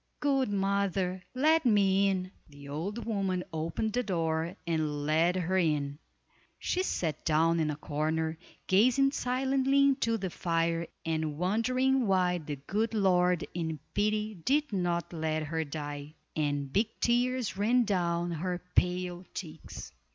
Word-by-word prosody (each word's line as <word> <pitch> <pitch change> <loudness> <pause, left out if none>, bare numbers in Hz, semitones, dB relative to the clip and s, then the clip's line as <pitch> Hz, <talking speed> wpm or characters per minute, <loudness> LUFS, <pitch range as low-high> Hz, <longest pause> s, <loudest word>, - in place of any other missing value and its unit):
Good 270 -4 +2
mother, 195 -2 0
let 315 +5 +4
me 200 -4 +4
in!" 185 -1 -2 0.2
The 145 -1 -12
old 180 +11 -4
woman 195 -5 -1
opened 165 +7 -2
the 250 - +2
door 165 -4 -1
and 155 -3 -1
led 165 +4 +3
her 185 +1 +1
in. 145 -4 0 0.6
She 365 - -1
sat 160 - -2
down 165 +1 +3
in 155 - +1
the 150 - -1
corner, 160 +2 -2 0.3
gazing 255 +8 +4
silently 265 +1 +1
into 260 -5 +2
the 190 -4 -4
fire 165 -1 0 0.2
and 155 -2 -1
wondering 255 +7 +2
why 180 -2 +2
the 150 -2 -5
good 210 +11 -2
Lord 180 -4 +3
in 160 -2 -2 0.2
pity 215 +1 0
did 275 - 0
not 175 -2 -1
let 155 -1 -1
her 160 +1 -2
die; 145 0 -6 0.2
and 145 -3 -1
big 210 +2 +3
tears 245 -1 +1
ran 235 +5 +3
down 175 -4 0
her 175 +2 -2
pale 180 0 0
cheeks. 100 - -8
180 Hz, 140 wpm, -30 LUFS, 160-215 Hz, 0.6 s, let